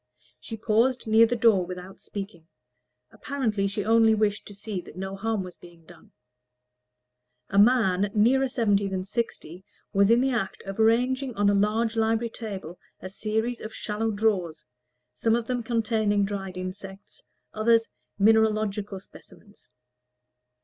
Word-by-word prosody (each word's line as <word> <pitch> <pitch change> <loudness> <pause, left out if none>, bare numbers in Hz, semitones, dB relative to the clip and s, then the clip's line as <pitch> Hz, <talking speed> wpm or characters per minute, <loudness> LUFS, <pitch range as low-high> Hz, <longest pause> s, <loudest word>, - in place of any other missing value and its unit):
She 225 - -8
paused 230 +4 +1
near 225 +1 +5
the 245 - -1
door 225 -5 +4
without 180 +1 -9
speaking: 195 -5 -8 0.6
apparently 225 -8 -2
she 205 0 -3
only 225 0 +4
wished 210 -1 -1
to 205 - -11
see 200 -2 -5
that - - -14
no 190 +1 -5
harm 215 0 -2
was 180 -1 -10
being 170 -2 -17
done. 175 0 -18 1.4
A 200 - +3
man 205 -4 +4
nearer 260 +6 +3
seventy 205 -6 +1
than 190 -1 -3
sixty 190 -5 -5 0.3
was 200 +1 +4
in 230 +1 +5
the 265 +1 +1
act 220 -6 -3
of 195 +2 -7
ranging 250 +3 +2
on 205 0 +3
a - - +1
large 220 +3 +1
library 225 +1 0
table 195 -7 -7 0.2
a 185 - -8
series 220 +4 -2
of 220 - -8
shallow 220 +1 -2
drawers, 200 -7 -1 0.5
some 225 - +1
of 235 -1 -2
them 245 0 -2
containing 220 -3 0
dried 195 -2 -5
insects, 195 - -8 0.3
others 225 +1 +3 0.3
mineralogical 215 -1 +2
specimens. 205 +2 -18
215 Hz, 145 wpm, -26 LUFS, 195-225 Hz, 1.4 s, near